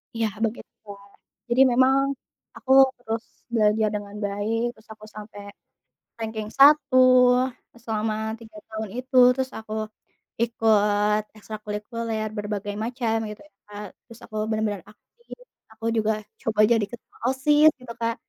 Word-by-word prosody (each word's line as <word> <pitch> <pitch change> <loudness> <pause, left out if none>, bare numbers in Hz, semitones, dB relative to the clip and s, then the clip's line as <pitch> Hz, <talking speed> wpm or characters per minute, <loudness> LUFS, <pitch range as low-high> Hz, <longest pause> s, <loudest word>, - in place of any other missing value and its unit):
Iya, 225 -1 0 0.2
begitu, 225 +2 -6
Kak. 200 0 -12 0.4
Jadi 240 +2 +3
memang, 260 +2 +4 0.6
aku 265 - -4 0.3
terus 225 -2 -4 0.3
belajar 215 -1 +3
dengan 205 0 -6
baik. 205 +3 -2
Terus 220 +2 -22
aku 215 0 -15
sampai 210 -1 -9 0.8
ranking 220 -1 -4
1 280 -1 +6 0.8
e - - -16
selama 220 -1 -1 0.3
3 220 -2 -14
tahun 220 -1 -5
itu. 255 +1 -6 0.2
Terus 260 -1 -2
aku 215 -1 -8 0.7
ikut 210 -2 +2 0.2
ekstrakurikuler 215 +1 -5
berbagai 205 -1 -4
macam, 235 -1 -1
gitu 210 - -9
ya, - - -54
Kak. 210 0 -8 0.2
Terus 230 -2 -15
aku 215 - -12
bener-bener 215 -3 -2
aktif, 475 - -16 0.3
aku 225 +1 -10
juga 220 0 +2 0.3
coba 220 -2 -3
jadi 225 -3 +3
ketua 240 - -13
OSIS, 295 +4 +4
gitu 245 -2 -8
Kak. 230 0 0
220 Hz, 135 wpm, -24 LUFS, 210-240 Hz, 0.8 s, 1